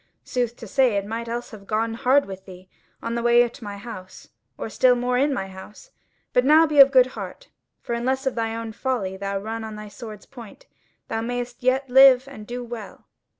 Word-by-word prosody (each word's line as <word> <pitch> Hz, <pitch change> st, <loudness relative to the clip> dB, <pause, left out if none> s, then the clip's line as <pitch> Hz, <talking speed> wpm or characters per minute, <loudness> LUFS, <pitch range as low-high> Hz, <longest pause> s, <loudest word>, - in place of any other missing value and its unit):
Sooth 245 Hz, -2 st, -2 dB
to -, -, -10 dB
say, 260 Hz, -6 st, +2 dB
it 200 Hz, -, -2 dB
might 230 Hz, +2 st, -5 dB
else 235 Hz, +1 st, -5 dB
have 200 Hz, -3 st, -12 dB
gone 225 Hz, +1 st, 0 dB
hard 260 Hz, +5 st, +3 dB
with 190 Hz, 0 st, -10 dB
thee 185 Hz, 0 st, -12 dB, 0.4 s
on 230 Hz, -, -3 dB
the 235 Hz, -, -1 dB
way 240 Hz, 0 st, +5 dB
to 235 Hz, 0 st, -13 dB
my 205 Hz, -1 st, -6 dB
house, 200 Hz, -4 st, -10 dB, 0.3 s
or -, -, -4 dB
still 250 Hz, +3 st, +3 dB
more 245 Hz, +1 st, -1 dB
in 280 Hz, +4 st, +2 dB
my 225 Hz, -8 st, -2 dB
house. 195 Hz, -, -12 dB, 0.4 s
But 250 Hz, -, +4 dB
now 310 Hz, +4 st, +6 dB
be 300 Hz, -2 st, +1 dB
of 275 Hz, 0 st, +10 dB
good 260 Hz, -2 st, +6 dB
heart, -, -, -8 dB, 0.3 s
for -, -, -4 dB
unless 260 Hz, +3 st, -1 dB
of 265 Hz, -, 0 dB
thine 225 Hz, -1 st, -2 dB
own 230 Hz, -1 st, -5 dB
folly 220 Hz, -5 st, -2 dB
thou 195 Hz, +1 st, -3 dB
run 220 Hz, +3 st, -5 dB
on 220 Hz, -1 st, -7 dB
the 210 Hz, 0 st, -9 dB
sword's 215 Hz, -4 st, -10 dB
point, 245 Hz, -, -13 dB, 0.4 s
thou 225 Hz, -, -2 dB
mayst 245 Hz, +1 st, -4 dB
yet 260 Hz, +2 st, +1 dB
live 265 Hz, 0 st, +7 dB
and 215 Hz, -6 st, -11 dB
do 245 Hz, +1 st, -5 dB
well." 230 Hz, -4 st, -9 dB
235 Hz, 215 wpm, -23 LUFS, 215-255 Hz, 0.4 s, of